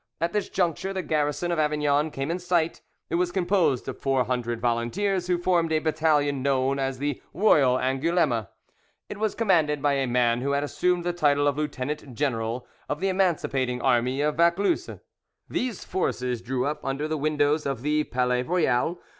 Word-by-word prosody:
At 170 +1 -1
this 210 -1 -1
juncture 185 +1 -1
the 190 -1 -3
garrison 150 +3 -1
of 170 - 0
Avignon 150 0 +1
came 135 +1 -3
in 175 - -2
sight; 175 -2 0 0.3
it - - +1
was 180 -1 0
composed 175 -8 +1
of - - -5
four 135 -2 +1
hundred 120 -1 -2
volunteers, 170 - 0
who 180 -1 +2
formed 175 -2 +1
a 160 - +3
battalion 155 -3 +1
known 135 0 +1
as 135 -1 -1
the 145 0 -3
Royal 140 -11 +4
Angouleme. 135 - +1 0.6
It 205 - -7
was 215 -1 0
commanded 160 -9 +2
by 145 0 +2
a 135 -1 0
man 120 -1 +2
who 140 +2 0
had 140 0 +1
assumed 175 +5 0
the 175 0 -1
title 145 -4 +2
of 145 - +1
Lieutenant 145 -2 -4
General 120 -3 -2 0.2
of 145 - -2
the 195 +2 0
Emancipating 145 -9 0
Army 125 +1 +1
of 150 0 0
Vaucluse. 170 - +2 0.6
These 245 -5 -3
forces 125 -9 -2
drew 125 +1 -2
up 150 +1 -3
under 135 +3 -2
the 155 - -2
windows 150 0 +1
of 135 -3 -3
the 150 +1 +1
"Palais 125 0 0
Royal." 165 +1 +1
145 Hz, 180 wpm, -26 LUFS, 130-170 Hz, 0.6 s, Royal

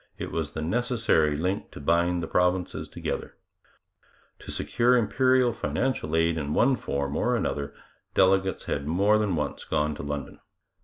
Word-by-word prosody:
It - - -5
was 80 -3 -3
the 80 - -4
necessary 115 - +1
link 90 +5 -2
to - - -11
bind 85 +3 +1
the - - -3
provinces 90 +1 0
together. - - -5 1.0
To - - -12
secure 125 +1 +2
Imperial 125 +2 +3
financial 120 -7 -2
aid 80 0 +2
in 75 -1 -3
one 135 +2 +4
form 70 - -3
or - - +1
another 70 -1 -2 0.4
delegates 95 0 +3
had 70 0 -3
more 100 +6 +3
than 105 -4 0
once 75 - -3
gone 75 0 0
to - - -7
London. 75 0 -5
90 Hz, 155 wpm, -26 LUFS, 75-110 Hz, 1.0 s, one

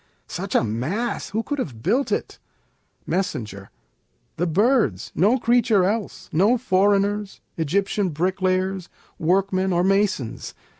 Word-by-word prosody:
such - - -5
a - - +4
mass! 140 - -2
who 220 +3 -2
could 290 +2 -3
have 120 - -5
built 240 - +1
it? - - -2 0.7
Mess. 185 +2 0
The 105 - -8
Birds; 165 - +1
no 210 +9 +3
creature 235 -5 +3
else, 210 +2 -3
no 200 +10 +4
foreigners, 205 -1 +1 0.2
Egyptian 195 +5 0
bricklayers, 185 +2 -1 0.3
workmen 190 +2 +1
or 175 0 +2
masons. 195 - 0
190 Hz, 115 wpm, -23 LUFS, 170-210 Hz, 0.7 s, a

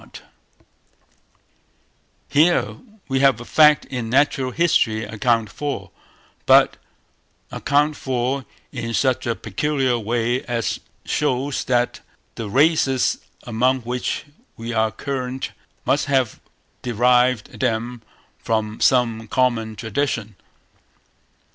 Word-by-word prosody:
Here 160 +5 +2 0.3
we 135 -2 0
have 135 -2 +4
a 120 - -8
fact 150 +1 +5
in 125 -3 -4
natural 135 0 +2
history 120 -8 +2
accounted 110 0 0
for, 145 +5 -4 0.6
but - - +6 0.7
accounted 150 +1 +1
for 130 +1 -2 0.3
in 115 -3 -4
such 130 +4 +1
a 115 - 0
peculiar 130 +4 -1
way 120 +3 -1
as 115 -4 -2 0.3
shows 140 -1 -1
that 120 -1 +1 0.3
the 115 -3 -6
races 135 0 +3 0.2
among 125 +3 +1
which 125 +4 -3 0.3
they 115 +1 -5
are 110 0 +2
current 130 +1 -4 0.3
must 145 - +2
have 130 -5 +1 0.4
derived 125 0 +2
them 120 -1 -1 0.4
from 110 -1 -2
some 115 -3 +2
common 115 -2 0
tradition. 110 -2 -2
125 Hz, 100 wpm, -21 LUFS, 115-135 Hz, 0.7 s, but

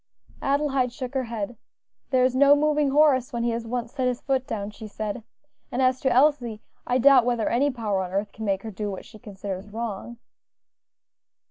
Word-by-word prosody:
Adelaide 275 -3 +1
shook 250 +1 -6
her 265 -2 -1
head. 230 0 -5 0.5
"There 255 -2 +3
is 255 0 +2
no 280 +2 +7
moving 300 -1 +2
Horace 280 -2 +4
when 235 -2 -2
he 235 - +1
has 230 0 -4
once 240 0 -3
set 260 -3 0
his 250 -1 -1
foot 265 -1 -1
down," 205 -1 -4
she 220 +1 -9
said; 215 +2 -4 0.5
"and 245 - -2
as 255 0 +3
to 265 - +2
Elsie, 250 -4 +3 0.3
I 250 - +2
doubt 260 0 +6
whether 240 -2 0
any 270 +5 +2
power 215 -7 -1
on 180 -1 -5
earth 200 +2 -2
can 220 - -8
make 195 -2 -1
her 220 - -6
do 210 +1 -4
what 190 - -6
she 215 - -14
considers 200 -2 -7
wrong." 230 +1 -5
240 Hz, 200 wpm, -25 LUFS, 215-265 Hz, 0.5 s, no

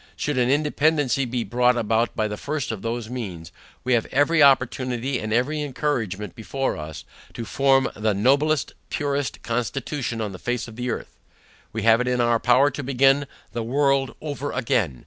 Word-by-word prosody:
Should 145 -3 -1
an 125 0 +2
independancy 145 -2 +2
be 120 -1 -1
brought 125 +4 +2
about 115 +1 +1
by 110 -1 0
the 105 - -4
first 145 +4 -3
of 110 -4 -5
those 115 0 -3
means, 95 -10 -6 0.3
we 130 - +1
have 115 -2 +2
every 145 +4 +3
opportunity 130 -1 +2
and 110 0 -4
every 135 +7 +1
encouragement 125 -8 -2
before 135 +4 -2
us, 75 0 -8 0.3
to 115 - -5
form 135 +3 +3
the 105 0 0
noblest 140 +7 +2 0.2
purest 145 -1 -2
constitution 125 +1 -2
on 105 -2 -2
the 95 - -9
face 120 -1 -2
of 115 - -11
the 125 +1 -3
earth. - - -5 0.5
We 110 -1 -4
have 115 +1 +5
it 125 - -2
in 125 0 +1
our 120 -1 +3
power 130 +5 +4
to 145 - -5
begin 135 +1 +3 0.2
the 120 - -3
world 135 +3 +1
over 145 -2 -4
again. 115 - 0
125 Hz, 180 wpm, -24 LUFS, 115-140 Hz, 0.5 s, have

